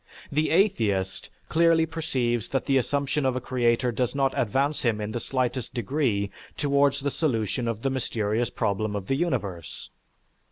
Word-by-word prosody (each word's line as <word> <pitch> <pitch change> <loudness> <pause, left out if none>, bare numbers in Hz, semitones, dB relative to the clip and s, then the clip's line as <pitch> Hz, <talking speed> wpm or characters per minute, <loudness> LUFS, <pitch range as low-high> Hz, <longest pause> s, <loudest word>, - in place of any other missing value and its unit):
The 155 +2 +1
atheist 110 - +1 0.2
clearly 165 0 +4
perceives 130 -8 -1
that 135 - -1
the 135 -1 +3
assumption 140 +3 0
of 130 -1 +1
a - - 0
creator 125 -1 +1
does 125 +3 -1
not 135 -1 +2
advance 135 +6 +1
him 115 -3 +1
in 105 0 -3
the 120 - -2
slightest 130 -1 -2
degree 120 -5 0 0.3
towards 140 -1 +2
the 140 0 -1
solution 120 - -1
of 115 -1 -3
the 135 - +1
mysterious 115 -3 -1
problem 105 +1 -1
of 100 -2 -3
the 135 - 0
universe. 105 - -3
130 Hz, 160 wpm, -26 LUFS, 110-140 Hz, 0.3 s, clearly